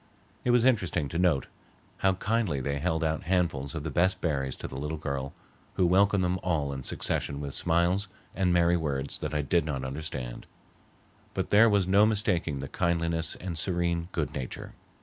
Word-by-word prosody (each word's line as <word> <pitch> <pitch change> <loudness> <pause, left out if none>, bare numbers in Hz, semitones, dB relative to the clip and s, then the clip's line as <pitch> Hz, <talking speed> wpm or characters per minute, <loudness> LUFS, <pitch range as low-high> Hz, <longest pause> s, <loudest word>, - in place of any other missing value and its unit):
It - - 0
was 120 0 +4
interesting 90 - +2
to 85 - -2
note 85 -7 +3 0.5
how 95 0 +3
kindly 100 -5 0
they 70 +2 -2
held 80 +1 0
out 80 0 0
handfuls 85 -5 0
of 80 - -4
the 80 - -3
best 90 +6 +2
berries 70 -5 -1
to - - -6
the - - -9
little 75 +2 -3
girl, 70 -2 -3 0.4
who 90 - +3
welcomed 95 +2 +4
them 90 +1 0
all 75 -6 0
in 65 - -5
succession 70 +2 -2
with 70 -2 -5
smiles 85 +5 +1 0.3
and 95 -2 +1
merry 85 0 +4
words 70 -4 -3
that 75 0 -4
I 75 - +1
did 85 +3 +2
not 70 -4 -3
understand. 65 -3 -5 0.9
But - - -2
there 110 +3 +7
was 100 -3 +2
no 100 +3 +5
mistaking 90 -8 +1
the 70 +1 -5
kindliness 85 -1 0
and 90 -2 -5
serene 85 -1 0
good 75 -3 -2
nature. 65 -4 -6
85 Hz, 185 wpm, -28 LUFS, 70-90 Hz, 0.9 s, there